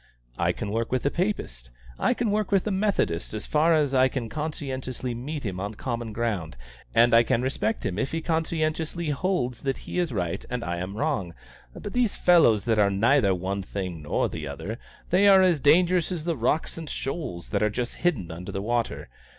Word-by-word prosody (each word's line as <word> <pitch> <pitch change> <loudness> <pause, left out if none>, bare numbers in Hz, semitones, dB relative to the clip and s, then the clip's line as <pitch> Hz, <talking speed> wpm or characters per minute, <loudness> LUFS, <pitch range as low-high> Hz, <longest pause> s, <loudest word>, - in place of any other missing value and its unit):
I - - +3
can 100 - -5
work 115 +1 -1
with 130 0 0
a 140 - +2
Papist; 65 - -3 0.3
I - - +2
can 235 -4 0
work 210 -1 0
with 195 -2 +3
a 210 - 0
Methodist, 190 - 0
as 105 - -5
far 160 +2 +3
as 145 -3 +1
I 130 0 +5
can 125 -3 -4
conscientiously 130 -4 -4
meet 140 +5 -5
him 95 -5 -4
on 100 +2 -4
common 115 0 -4
ground, 105 - -2 0.4
and 120 0 +5
I 115 - +8
can 115 +1 +1
respect 115 -4 -1
him 90 +2 -2
if 135 - -1
he 165 - -1
conscientiously 160 0 -1
holds 140 -6 -1
that 135 -1 -1
he - - -3
is 175 -4 0
right 90 -7 -2
and 125 -1 -3
I 85 0 -2
am 95 +4 -5
wrong: 110 - -1 0.4
but 205 - -7
these 245 -4 +1
fellows 140 - +5
that 110 -2 +2
are 100 -1 +5
neither 100 0 +3
one 95 +2 -3
thing 90 -4 -5
nor 75 - 0
the 80 -2 -6
other 100 - -6 0.3
they 190 +3 +5
are 195 -1 +7
as 175 -5 +3
dangerous 175 +5 +4
as 165 -4 -4
rocks 155 0 0
and 160 -3 -7
shoals 135 - -4
that - - 0
are 105 - +3
just 120 +3 -4
hidden 120 - 0
under 90 +4 -7
the 95 - -3
water. 120 +1 -1
125 Hz, 205 wpm, -26 LUFS, 100-165 Hz, 0.4 s, I